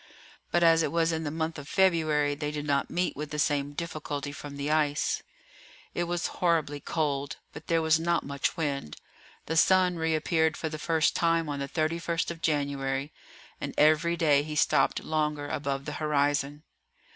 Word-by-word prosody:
But 175 - +2
as 165 -1 +6
it - - 0
was 165 0 +2
in 160 0 -2
the - - -1
month 160 +1 -3
of 140 - -10
February 155 -6 +2
they 150 +1 -3
did 150 0 -4
not 140 -1 0
meet 180 +1 -1
with 150 +1 -5
the 150 - -5
same 145 -1 0
difficulty 150 -3 -4
from 145 0 -8
the 140 +1 -2
ice. 150 -2 +1 0.7
It 175 - -1
was 175 0 -2 0.2
horribly 160 -5 +1
cold, 145 -1 -2 0.2
but 150 - -10
there 165 -1 +2
was 160 0 +4
not 170 +1 0
much 140 +4 -2
wind. 140 - -3 0.5
The 160 - -2
sun 180 +1 +4
reappeared 160 0 +1
for 160 - -3
the 155 0 -6
first 160 -1 +1
time 165 -1 +2
on 145 -1 -3
the 140 0 -4
31st 165 +1 -1
of 165 -1 -9
January, 140 -2 -1 0.5
and - - -4
every 155 +3 +4
day 150 -4 +4
he 150 +1 -6
stopped - - +2
longer 150 -2 -1
above 140 -1 -3
the - - -4
horizon. 145 -1 0
155 Hz, 180 wpm, -28 LUFS, 145-165 Hz, 0.7 s, as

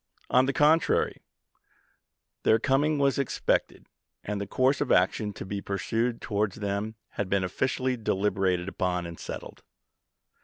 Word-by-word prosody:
On 130 +1 +5
the - - +2
contrary, 150 +4 +3 1.2
their 110 - +4
coming 140 +5 +2
was 140 -1 +2
expected, 140 - 0 0.4
and 105 -1 -3
the 100 - -4
course 130 +5 +2
of - - 0
action 105 +3 +2
to - - -7
be 100 +1 -4
pursued 115 +6 -1
towards 105 -2 -1
them 105 +1 -3
had 100 -2 -4
been 100 -1 +2
officially 130 +7 -1
deliberated 95 -4 0
upon 90 -2 -1
and 85 -1 -8
settled. - - -7
105 Hz, 140 wpm, -27 LUFS, 95-130 Hz, 1.2 s, On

